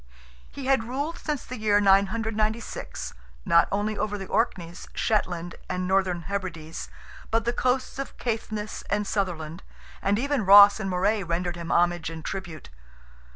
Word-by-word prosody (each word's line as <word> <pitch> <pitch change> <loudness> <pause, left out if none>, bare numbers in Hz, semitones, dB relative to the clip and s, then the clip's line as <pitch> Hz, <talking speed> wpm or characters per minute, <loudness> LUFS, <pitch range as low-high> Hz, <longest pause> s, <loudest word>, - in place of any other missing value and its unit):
He 275 - -8
had 265 -4 +2
ruled 285 +7 -3
since 300 -4 -3
the 255 -2 -7
year 210 -1 +3
996, 215 +3 0 0.3
not 170 - +5
only 210 +2 0
over 205 0 -2
the 195 - -6
Orkneys, 175 -6 -2
Shetland, 175 -5 0 0.2
and 185 0 -2
Northern 185 -2 +1
Hebrides, 170 -5 -5 0.4
but 225 0 +1
the 240 - +1
coasts 255 +2 0
of 275 - -5
Caithness 220 -2 -3
and 205 +1 0
Sutherland, 175 -5 -2 0.4
and 200 +1 +2
even 280 0 0
Ross 200 +2 +9
and 195 -2 -2
Moray 200 +4 +1
rendered 175 0 -2
him 170 -1 -5
homage 175 -1 +2
and 160 -1 -8
tribute. 170 - -6
200 Hz, 150 wpm, -26 LUFS, 175-225 Hz, 0.4 s, Ross